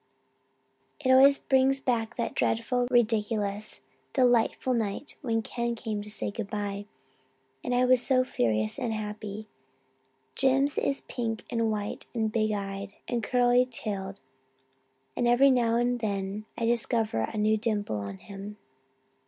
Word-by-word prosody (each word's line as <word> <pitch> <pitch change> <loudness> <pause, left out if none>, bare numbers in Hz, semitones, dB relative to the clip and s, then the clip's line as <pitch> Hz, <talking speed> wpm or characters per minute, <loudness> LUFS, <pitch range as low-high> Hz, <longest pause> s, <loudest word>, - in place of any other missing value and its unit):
It 260 - +4
always 275 +2 +7
brings 270 0 +2
back 240 -3 -1
that 235 - -2
dreadful, 245 +2 0
ridiculous, 215 -3 0 0.3
delightful 250 0 +2
night 225 +4 -3
when 225 -4 0
Ken 235 +1 -2
came 220 -3 -4
to 210 - -9
say 210 - -4
good 205 -1 -5
bye, 205 -1 -4 0.8
and 245 - -1
I 250 +1 +4
was 250 -1 +4
so 255 0 +3
furious 110 - 0
and 230 -2 -1
happy. 210 0 -5 0.9
Jims 270 +1 +2
is 275 - -1
pink 225 -3 -4
and 230 -1 +1
white 210 -1 -3
and 220 -2 0
big 215 -1 +1
eyed 200 -1 -4
and 240 -1 -1
curly 245 +1 +3
haired 195 -2 -4 1.0
and 240 - +1
every 260 +3 +6
now 235 -3 +2
and 245 +1 +1
then 200 -1 -3
I 230 - -1
discover 230 - +1
a - - -6
new 215 +1 +3
dimple 210 - -1
in 100 -1 -7
him. 200 - -9
225 Hz, 145 wpm, -28 LUFS, 205-245 Hz, 1.0 s, always